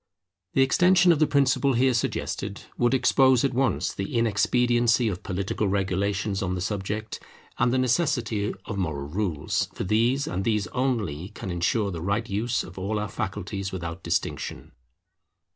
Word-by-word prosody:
The 135 - +5
extension 180 +6 +5
of 160 - +2
the 155 - +4
principle 140 -1 +2
here 130 +2 +3
suggested 120 - -2
would 120 +2 +2
expose 130 0 +4
at 135 - 0
once 130 -4 0
the 95 +4 -4
inexpediency 120 +2 +2
of 95 -4 -3
political 95 +3 -2
regulations 100 +1 -1
on 95 -1 -1
the - - -3
subject, 105 +3 -3 0.4
and 120 - +3
the 130 - +2
necessity 120 -5 +1
of 105 -3 -4
moral 75 -6 -2
rules; 90 -4 -1
for - - -3
these 115 +8 +2
and 95 -5 -3
these 105 -2 +1
only 110 - -2
can 100 -3 -7
ensure 100 +4 0
the 85 -3 -5
right 100 +6 -1
use 115 +4 -1
of 90 +1 -10
all 100 +3 -2
our 105 0 -2
faculties 95 -1 -4
without 85 -1 -5
distinction. - - -3
105 Hz, 160 wpm, -26 LUFS, 95-125 Hz, 0.4 s, The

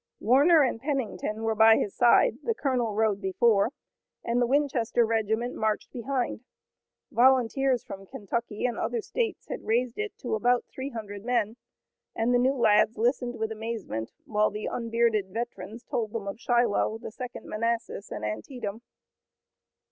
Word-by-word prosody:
Warner 285 +8 +5
and 240 -3 -1
Pennington 255 -6 -2
were 225 0 +1
by 220 +1 +6
his 200 - -2
side, 245 - +4
the 460 - -1
colonel 245 - 0
rode 215 -2 +1
before, 200 +2 +3 0.5
and 235 +1 0
the 245 - +3
Winchester 250 -4 +2
regiment 225 +2 0
marched 215 -1 -1
behind. 250 -1 -2 0.7
Volunteers 255 0 +3
from 195 -4 -9
Kentucky 215 +3 -3
and 245 - -1
other 470 - -1
states 465 +1 -3
had - - -5
raised 240 +2 0
it 425 -1 -4
to 245 - -4
about 245 +3 +2
three 265 +1 -4
hundred 205 -5 -7
men, 230 -2 0 0.6
and 230 +2 +1
the 245 - +4
new 260 +3 +2
lads 220 -2 +3
listened 240 +1 0
with 220 0 -2
amazement, 220 - -4 0.2
while 210 0 +2
the 210 +1 -6
unbearded 230 -3 0
veterans 225 +1 -6
told 220 -2 -3
them 215 -3 -4
of 200 +3 -5
Shiloh, 240 -3 +1
the 225 - -8
Second 250 +1 -8
Manassas 230 -2 -2
and 105 - -5
Antietam. 200 - -5
230 Hz, 155 wpm, -27 LUFS, 215-250 Hz, 0.7 s, by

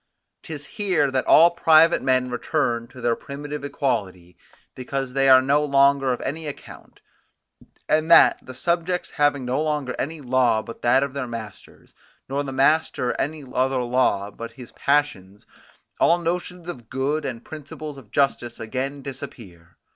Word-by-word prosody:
'Tis 145 -3 -8
here 185 -9 0
that 130 -1 -1
all 170 +2 +7
private 165 -1 +4
men 130 -1 +1
return 120 -2 -1
to 125 - -13
their 120 0 +1
primitive 145 +3 -7
equality, 100 - -3 0.4
because 130 0 -4
they 135 0 +3
are 130 0 +7
no 145 +3 +2
longer 140 -1 +3
of 125 - -2
any 155 +3 -4
account; 145 - -11 0.9
and 155 +1 +1
that, 170 - +7
the 130 - -10
subjects 175 +5 -1
having 145 -3 +1
no 130 +4 -1
longer 150 -4 -2
any 155 +4 -3
law 130 -4 +2
but 115 - -10
that 130 +3 +3
of 140 -2 -4
their 140 -3 -4
master, 115 -4 -9 0.4
nor 140 +2 -2
the 135 - -5
master 135 -2 +1
any 150 +1 -4
other 130 0 +1
law 120 -5 0
but 115 +2 -9
his 125 -3 -12
passions, 110 -10 -1 0.5
all 170 - +4
notions 175 0 -4
of 120 -10 -8
good 140 +4 -1
and 125 -4 -6
principles 155 -1 -8
of 130 -6 -14
justice 120 -2 0
again 135 +5 -4
disappear. 110 -11 -10
135 Hz, 155 wpm, -23 LUFS, 125-150 Hz, 0.9 s, all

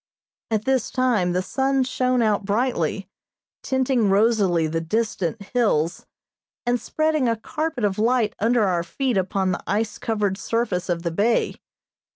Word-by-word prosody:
At 215 -1 -1
this 265 -3 +1
time 235 -9 +1
the 180 +1 0
sun 270 +4 +1
shone 255 -1 +1
out 210 -2 +1
brightly, 200 - -1 0.5
tinting 260 -5 +1
rosily 195 -5 +3
the 165 +1 -1
distant 215 +2 -1
hills, 185 -9 +1 0.6
and 245 0 +1
spreading 310 -5 +1
a 230 - +1
carpet 305 +2 -3
of 205 -1 0
light 230 -1 +2
under 230 +1 +3
our 180 -4 +1
feet 250 +9 -2
upon 190 0 0
the 180 - -3
ice 210 +3 -1
covered 205 -3 -1
surface 210 -7 -1
of 170 -1 -1
the 170 - -1
bay. 210 +7 +1
220 Hz, 150 wpm, -23 LUFS, 190-250 Hz, 0.6 s, rosily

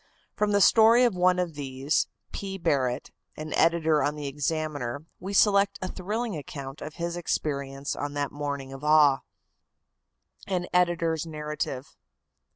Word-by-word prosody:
From 210 0 0
the 205 0 +3
story 225 +4 +6
of 240 -4 +3
one 180 0 +3
of 180 -2 -1
these, 140 0 -1 0.2
P. 195 -1 -5
Barrett, 130 -8 0 0.3
an 155 0 -5
editor 160 -2 +3
on 145 +2 0
the 150 -1 -6
Examiner, 145 -1 -3
we 190 - -6
select 200 0 +4
a 185 - -3
thrilling 210 +3 -3
account 140 -2 -7
of 155 +1 -7
his 170 0 -3
experience 140 -4 -2
on 145 0 -4
that 145 -1 -1
morning 140 -2 -4
of 135 +1 -10
awe. 150 -3 +5 1.3
AN 180 -2 -1
EDITOR'S 170 -2 +1
NARRATIVE. 150 -3 -5
155 Hz, 145 wpm, -27 LUFS, 140-180 Hz, 1.3 s, story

